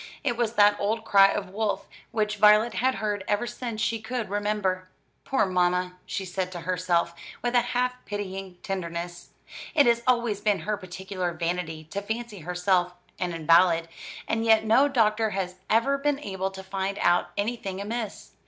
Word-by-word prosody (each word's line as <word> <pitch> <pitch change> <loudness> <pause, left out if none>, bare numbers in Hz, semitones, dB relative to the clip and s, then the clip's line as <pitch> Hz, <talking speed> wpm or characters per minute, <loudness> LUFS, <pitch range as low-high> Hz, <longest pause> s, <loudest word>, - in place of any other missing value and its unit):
It 250 -5 0
was 235 -1 0
that 205 -1 +5
old 220 +2 -1
cry 195 -2 +7
of 195 -1 -3
"wolf," 200 -1 -1 0.2
which 210 -1 -1
Violet 210 +2 +6
had 260 +3 +1
heard 210 -2 -2
ever 205 +3 +1
since 235 -2 -5
she 225 0 0
could 230 -3 -4
remember. 205 -3 -1 0.4
"Poor 265 - +2
mamma!" 180 0 +1
she 195 - -3
said 185 0 -3
to 175 - -6
herself, 175 -1 0 0.3
with 240 0 0
a 245 - +5
half 245 +1 0
pitying 195 -3 -5
tenderness, 175 -2 -5 0.5
"it 290 - +6
has 235 -1 +3
always 235 -5 +2
been 205 -4 +1
her 210 +5 -1
particular 185 -1 -4
vanity 165 -1 -3
to 200 - -3
fancy 220 0 -5
herself 180 +1 0 0.2
an 180 -1 -1
invalid; 165 +1 +4 0.4
and 225 0 0
yet 220 -1 +4
no 235 +6 +5
doctor 225 -4 +2
has 185 -2 -3
ever 270 +6 +3
been 290 0 +1
able 190 -8 -3
to 190 0 -9
find 195 +1 -3
out 175 0 +3
anything 205 -3 -2
amiss. 215 +1 -5
200 Hz, 170 wpm, -26 LUFS, 185-225 Hz, 0.5 s, cry